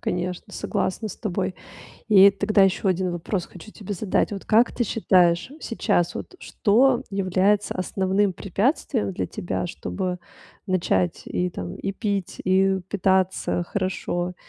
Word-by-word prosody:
Конечно, 180 0 -3
согласна 215 +4 -2
с - - -8
тобой. 190 -3 -2 0.5
И 200 -1 +8
тогда 200 +1 +2
еще 195 +1 +2
1 185 0 0
вопрос 175 +2 -3
хочу 190 +4 -13
тебе 205 -1 -6
задать. 200 +2 0
Вот 195 - -6
как 230 +2 +4
ты 240 - -1
считаешь, 180 -3 +2
сейчас 175 -6 0
вот 370 - -7
что 250 +2 +2
является 195 +1 +1
основным 190 +1 0
препятствием 210 - -1
для - - -3
тебя, 175 - -3
чтобы 180 +1 -4 0.5
начать 165 - 0
и, 180 0 -1
там, 90 - -6
и 195 - -4
пить, 200 -2 -3
и 190 +1 +3
питаться 190 -2 +1
хорошо, 180 -1 -2
190 Hz, 135 wpm, -24 LUFS, 180-205 Hz, 0.5 s, И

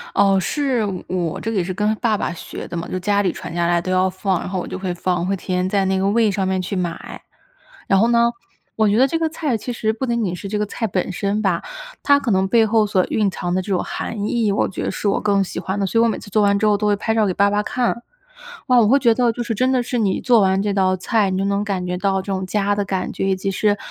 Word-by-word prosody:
哦， 195 -1 +4
是， 265 +2 0 0.2
我 175 -3 -2
这 225 - -3
个 220 - -2
也 185 - +2
是 185 +2 -4
跟 210 +3 +1
爸 220 -1 0
爸 - - -2
学 170 - -8
的 - - -7
嘛， 170 0 -4
就 - - -3
家 205 +2 +1
里 190 -3 +1
传 - - -8
下 170 0 0
来 175 0 +2
都 185 - -4
要 185 0 +2
放， 185 -1 -1
然 - - -5
后 185 -1 -2
我 - - -5
就 185 - -5
会 185 -2 -3
放， 175 0 -1
会 195 +2 0
提 185 - -13
前 180 0 0
在 195 0 +1
那 190 0 +1
个 190 - 0
Weee 215 +1 +3
上 195 -1 -1
面 190 0 0
去 185 +2 -4
买。 175 -2 -4 0.7
然 195 - +4
后 225 - +4
呢， 235 0 +3 0.4
我 215 -1 +3
觉 205 - +2
得 260 +3 +5
这 325 +4 -1
个 325 -1 0
菜 310 -5 -2
其 245 - -5
实 220 -2 -1
不 230 +4 -3
仅 235 -2 0
仅 180 -3 -2
是 200 - -7
这 210 +2 -2
个 210 - 0
菜 225 +2 -3
本 185 -1 -2
身 200 +3 -1
吧， 190 -5 +1 0.4
它 285 0 +4
可 255 -5 -2
能 190 0 +2
背 225 +2 +4
后 220 -1 +2
所 190 -3 +2
蕴 210 -2 +1
藏 175 -2 -3
的 185 - +1
这 200 +2 -6
种 185 - +1
含 210 -2 -4
义， 225 -2 +1
我 200 - +1
觉 190 - -5
得 - - -1
是 200 - -3
我 200 - +2
更 200 -2 +2
喜 185 - -5
欢 190 +3 -3
的， 200 - +1
所 225 +4 +1
以 - - +5
我 230 - +3
每 - - -2
次 - - -11
做 215 - +3
完 200 0 +3
之 210 - 0
后 210 -1 +4
都 210 +1 -1
会 205 - +3
拍 220 +2 -1
照 220 -1 +2
给 185 - 0
爸 200 +2 +3
爸 205 +1 +1
看。 235 +2 -1 0.7
哇， 250 -2 +4
我 215 - +3
会 270 +6 +4
觉 235 -4 +3
得 245 -1 +2
就 240 - -6
是 230 -1 -3
真 255 +4 +1
的 255 -1 +2
是 245 0 -3
你 205 -5 +1
做 240 -3 +4
完 190 0 +2
这 205 0 -1
道 185 -1 +2
菜， 205 +2 +1
你 185 - -1
就 195 - 0
能 200 +1 0
感 195 -4 -2
觉 180 0 -2
到 195 +1 0
这 195 +1 -4
种 190 0 -2
家 205 +1 0
的 205 - 0
感 190 -1 -3
觉， 195 - -2
以 190 - +2
及 190 +1 -3
是 205 +2 +1
200 Hz, 335 characters per minute, -20 LUFS, 185-220 Hz, 0.7 s, 得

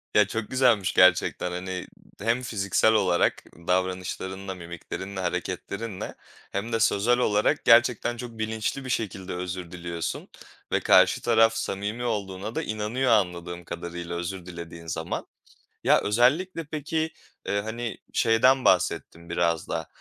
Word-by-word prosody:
Ya, 105 -2 +6
çok 110 +1 -4
güzelmiş 120 -7 +3
gerçekten, 90 0 +4
hani, 90 +1 -5 0.2
ımm, 105 - -13
hem 120 +2 +2
fiziksel 110 -1 +2
olarak 90 -5 +2 0.2
davranışlarınla, 95 +1 -2
mimiklerinle, 90 +3 -7
hareketlerinle 100 +3 -4 0.4
hem 110 +4 -3
de 115 - +2
sözel 115 +3 +3
olarak 105 -4 +2
gerçekten 120 0 +5
çok 120 0 -6
bilinçli 110 +4 -2
bir - - -5
şekilde 95 -5 -3
özür 90 -1 -5
diliyorsun 85 -2 -4 0.4
ve - - +3
karşı - - +5
taraf 115 -1 +4
samimi 105 +2 -3
olduğuna 105 -2 -3
da - - -1
inanıyor 110 +4 -1
anladığım 90 -4 0
kadarıyla 85 0 -6
özür 85 +1 -4
dilediğin 85 -1 -9
zaman. 75 - -3 0.6
Ya, - - +5
özellikle 145 - +2
peki, 160 +1 -2 0.3
eee, 100 0 0
hani, 115 +2 -4 0.2
şeyden 125 +4 +4
bahsettin 85 -1 +1
biraz 85 -2 0
da, - - -3
100 Hz, 130 wpm, -26 LUFS, 90-115 Hz, 0.6 s, Ya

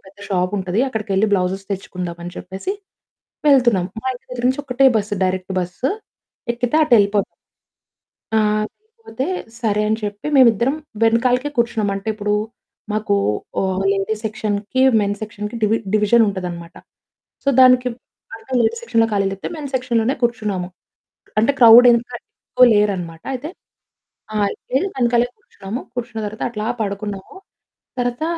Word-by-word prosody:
పెద్ద 195 +1 -17
షాపు 185 0 0
ఉంటది. 185 +3 -1
అక్కడికెళ్లి 215 -3 0
బ్లౌజె‌స్ 190 0 0
తెచ్చుకుందాం 180 -3 -5
అని 175 - -6
చెప్పేసి 190 - -5 0.8
వెళ్తున్నాం. 240 -10 +4 0.2
మా - - -7
ఇంటి 250 - -13
దగ్గర 245 -1 -5
నుంచి 260 +3 0
ఒకటే 270 +1 +3
బస్సు. 205 -1 -1
డైరెక్ట్ 185 0 -2
బస్సు 180 +10 -2 0.6
ఎక్కితే 245 +4 -1
అటేళ్ళిపోతాం. 205 -7 +3 1.1
ఆ! - - +5 0.4
సరిపోతే 435 - -7 0.3
సరే 210 -3 +1
అని 220 - +1
చెప్పి 205 +3 -5
మేము 260 -3 +8
ఇద్దరం 240 +7 0 0.3
వెనకాలకే 245 +4 +2
కూర్చున్నాం. 230 -3 +1
అంటే 195 +2 -5
ఇప్పుడు 210 -1 -2 0.6
మాకు 215 -1 0 0.5
ఓహ్, 190 0 -1
లేడీస్ 200 +2 -1
సెక్షన్‌కి 215 +2 -2 0.2
మెన్ 205 0 0
సెక్షన్‌కి 210 +1 -6
డివి 215 +1 +3 0.2
డివిజన్ 215 +2 +4
ఉంటది 190 -2 -3
అన్నమాట. 170 -1 -9 0.7
సో - - 0
దానికి 255 -1 +6 0.4
బాగా 225 +3 -10
లేడీ 230 0 +2
సెక్షన్‌లో 230 -1 +2
ఖాళీ 200 -1 +1
లేతే 195 - -5
మెన్ 290 -3 -6
సెక్షన్‌ 250 -2 0
లోనే 240 +5 +1
కూర్చున్నాము. 210 -6 -1 0.7
అంటే 230 +6 +3
క్రౌడ్ 235 +1 +9
వెనుకాల 240 0 +1 0.3
ఎక్కువ 255 0 +6
లేరు 205 0 +3
అన్నమాట. 165 -2 -7
అయితే, 265 +4 -5 0.9
ఆ! - - -1 0.4
వెళ్ళి 275 +10 +1
వెనకాలే 240 -1 +2
కూర్చున్నాము. 205 +5 -7
కూర్చున్న 235 -2 -4
తర్వాత 210 +1 -7
అట్లా 215 -2 -4 0.2
పడుకున్నాము. 200 - -5 0.6
తర్వాత 245 +4 -1
220 Hz, 140 wpm, -20 LUFS, 200-245 Hz, 1.1 s, క్రౌడ్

